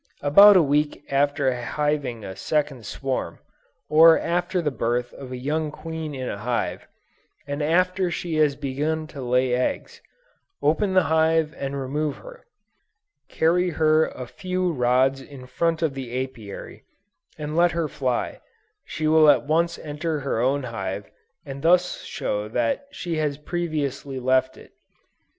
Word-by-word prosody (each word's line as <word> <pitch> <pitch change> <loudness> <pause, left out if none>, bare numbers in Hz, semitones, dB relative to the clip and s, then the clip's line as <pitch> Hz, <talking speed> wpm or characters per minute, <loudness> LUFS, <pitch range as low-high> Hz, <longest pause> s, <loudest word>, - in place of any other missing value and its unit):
About 200 +8 +8
a 175 - +5
week 145 +1 0
after 140 -1 +2
hiving 125 -1 -2
a 95 - -7
second 140 0 -2
swarm, 135 -2 -3 0.5
or 160 +1 +7
after 175 +2 -1
the 155 -4 -1
birth 120 -1 -2
of 130 -2 -10
a 125 - -4
young 150 +4 -1
queen 160 -1 -6
in 130 -1 -4
a 100 - -4
hive, 120 +2 -2 0.6
and 145 +1 -4
after 180 +4 +2
she 175 -1 -4
has 150 -2 +3
begun 150 +4 -2
to 145 -3 -9
lay 125 0 +1
eggs, 125 +1 -2 0.6
open 185 +6 +1
the 185 - +5
hive 160 0 +2
and 140 0 -4
remove 145 +3 -2
her: - - -13 0.8
carry 180 +3 +2
her 155 -1 +3
a 130 - -7
few 185 +6 -2
rods 130 0 +2
in 135 -1 -11
front 165 +5 -1
of 155 -4 +1
the 130 -2 -4
Apiary, 110 -4 -10 0.5
and 150 0 -5
let 175 +1 +4
her 165 -2 -1
fly; 130 -4 -2 0.4
she 160 -4 -5
will 155 0 +6
at 130 -5 +4
once 170 +3 +1
enter 150 0 -4
her 135 -4 -2
own 135 +3 +1
hive 100 -4 -5 0.3
and 135 0 -7
thus 180 +3 +2
show 105 0 -3
that 120 - -1
she 170 - -4
has 150 -2 -1
previously 145 -4 -3
left 130 +1 +1
it. - - -16
145 Hz, 150 wpm, -24 LUFS, 130-160 Hz, 0.8 s, About